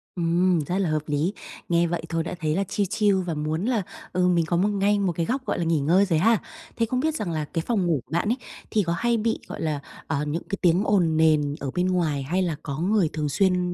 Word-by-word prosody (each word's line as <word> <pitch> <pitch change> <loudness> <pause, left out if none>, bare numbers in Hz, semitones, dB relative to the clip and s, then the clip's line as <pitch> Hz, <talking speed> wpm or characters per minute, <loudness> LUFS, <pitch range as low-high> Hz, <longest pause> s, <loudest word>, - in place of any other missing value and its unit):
Ừm, 175 +1 +2
rất 180 +5 -1
là 190 -5 +1
hợp 155 -1 0
lý. 150 +7 0 0.4
Nghe 170 0 +3
vậy 175 +1 -2
thôi 165 -1 0
đã 180 - -5
thấy 155 0 0
là 195 - +1
chill 200 +1 -1
chill 200 -3 +2
và 175 -2 -3
muốn 155 +5 -2
là, 240 -4 +1 0.3
ừ, 180 0 +2
mình 170 -2 +3
có 170 +1 0
một 200 +4 +2
ngay 205 0 +2
một 190 -3 +1
cái 165 0 -1
góc, 260 +2 -2
gọi - - -1
là, - - 0
nghỉ 165 -2 +2
ngơi 175 +8 +4
rồi 165 -4 +1
ha. 225 +4 +4 0.4
Thế 230 - +2
không 250 +3 -1
biết 315 +2 0
rằng 195 - -3
là 155 -2 -2
cái 165 - -3
phòng 210 -7 +1
ngủ 155 -7 +1
của - - -28
bạn 175 +6 0
ấy, 245 - +1 0.3
thì 210 -2 +2
có 170 0 -1
hay 235 +2 +1
bị, 225 +1 0
gọi - - -7
là, 155 -3 -1 0.3
ờ, 145 +1 -1
những 155 +3 -3
cái 195 - -2
tiếng 180 +2 +3
ồn 175 -7 +2
nền 150 -2 +3
ở 135 -2 -4
bên 180 +1 +1
ngoài 160 -7 0
hay 180 +7 0
là 170 -4 0
có 140 -1 -4
người 190 -2 +2
thường 150 -2 -1
xuyên 180 +1 +1
175 Hz, 270 wpm, -25 LUFS, 160-200 Hz, 0.4 s, ngơi